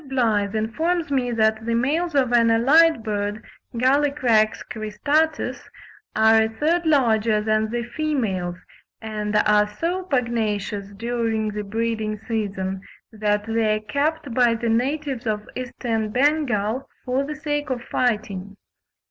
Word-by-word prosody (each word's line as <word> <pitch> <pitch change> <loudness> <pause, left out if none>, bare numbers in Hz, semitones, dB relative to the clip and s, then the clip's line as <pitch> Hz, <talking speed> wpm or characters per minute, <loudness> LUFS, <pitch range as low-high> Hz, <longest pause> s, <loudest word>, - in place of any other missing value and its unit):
Blyth 220 -6 +1
informs 315 +10 -1
me 255 -3 +1
that 220 -1 +1
the 230 0 -1
males 295 +7 0
of 260 -3 +2
an 235 -1 +4
allied 275 +4 +5
bird 210 0 -3 0.3
(Gallicrex 255 -4 +2
cristatus) 290 +9 -1 0.5
are 220 0 +5
a 220 - +1
third 320 +9 0
larger 225 -7 +3
than 215 0 +1
the 240 +1 -2
females, 235 - -2 0.4
and 210 -1 -4
are 210 0 +4
so 335 - -2
pugnacious 220 - -2
during 230 -1 -1
the 210 0 -4
breeding 220 0 -2
season 200 -4 -3 0.3
that 210 -1 0
they 225 -1 +1
are - - -2
kept 285 +4 -2
by 240 -1 +3
the 230 0 -2
natives 265 +1 -1
of 210 -1 -2
Eastern 235 -3 -3
Bengal 255 -3 0 0.2
for 255 +2 0
the 300 +2 -5
sake 295 -1 -3
of 245 -2 -3
fighting. 205 -5 -2
230 Hz, 130 wpm, -23 LUFS, 215-275 Hz, 0.5 s, allied